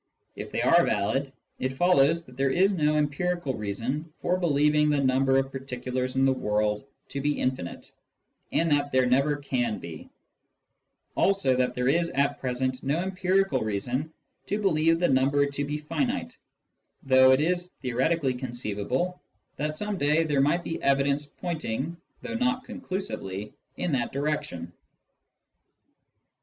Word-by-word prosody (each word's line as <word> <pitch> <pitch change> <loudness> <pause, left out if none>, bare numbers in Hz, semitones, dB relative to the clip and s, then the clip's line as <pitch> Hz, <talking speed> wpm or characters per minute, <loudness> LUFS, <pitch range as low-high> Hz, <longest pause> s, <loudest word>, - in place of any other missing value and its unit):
If - - -6
they - - -1
are - - +6
valid, 135 +7 0 0.3
it 130 0 -1
follows 165 -1 +4
that 125 - -15
there 135 +1 +1
is 190 +8 +3
no 150 -3 +2
empirical 150 0 -1
reason 120 +9 -3
for 180 - +1
believing 150 -3 +3
the 150 - +2
number 135 0 +3
of 135 0 0
particulars 130 -1 -4
in 135 0 +3
the 135 - +4
world 105 -3 0 0.3
to 140 - -4
be 145 +1 0
infinite, 130 -9 -3 0.6
and 165 -1 +1
that 145 -1 +2
there 130 0 +3
never 140 +4 +3
can 125 -6 -1
be; 80 -2 -9 1.1
also 195 -10 +2
that 125 0 0
there 125 0 0
is 170 +5 +2
at 140 -2 0
present 130 0 -2
no 140 +4 0
empirical 190 -4 +1
reason 120 +8 -2 0.4
to 205 - -1
believe 165 -4 +3
the 175 +1 +2
number 140 +2 +3
to 140 0 -3
be 145 +1 -3
"finite, 245 - -2 0.7
though 130 -1 +6
it 130 - +5
is 175 +3 0 0.2
theoretically 130 +3 +1
conceivable 125 - -3 0.4
that 150 +2 -2
some 210 0 -3
day 150 +3 +3
there 145 -3 +1
might 160 +5 +2
be 165 - -4
evidence 140 +1 +1
pointing, 155 -2 -4 0.3
though 240 - -5
not 250 +2 0
conclusively, 185 - -5 0.2
in 175 - -1
that 130 -4 0
direction. 135 - -3
140 Hz, 150 wpm, -27 LUFS, 130-165 Hz, 1.1 s, are